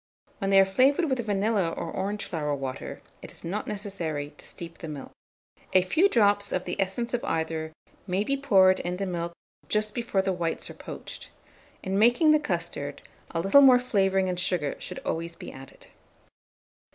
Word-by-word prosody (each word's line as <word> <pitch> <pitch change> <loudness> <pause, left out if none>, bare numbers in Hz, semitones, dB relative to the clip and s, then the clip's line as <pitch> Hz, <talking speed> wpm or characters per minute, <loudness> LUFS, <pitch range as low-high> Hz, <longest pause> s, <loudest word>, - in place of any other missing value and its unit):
When 195 -2 -1
they 195 0 +6
are 195 - +7
flavoured 275 - +3
with 260 - +1
vanilla 205 -3 +1
or 165 0 -5
orange 200 +2 -3
flower 150 -3 -2
water, 135 -2 -6 0.2
it - - -9
is - - -10
not 195 +6 -3
necessary 175 -8 -3
to - - -7
steep 170 -1 -9
the 165 - -7
milk. 145 -3 -7 0.6
A 185 - +6
few 320 - +3
drops 205 - +3
of 185 - -1
the 180 - -3
essence 195 +6 -2
of 240 - -1
either 160 -1 -2 0.4
may 185 +2 +1
be 275 +6 +1
poured 190 -9 +4
in 180 +1 -3
the 195 - -2
milk 170 -2 -3 0.4
just 215 0 +1
before 230 -5 0
the 190 -1 0
whites 170 -2 -3
are - - -9
poached. - - -9 0.5
In 190 +1 0
making 245 +8 +5
the 305 - +5
custard, 295 - -4 0.3
a 165 - -2
little 195 +10 +6
more 260 -2 +8
flavouring 195 -6 +1
and 180 -1 -2
sugar 175 -5 0
should - - -6
always 165 +1 -3
be - - -9
added. 135 0 -13
195 Hz, 185 wpm, -27 LUFS, 170-215 Hz, 0.6 s, more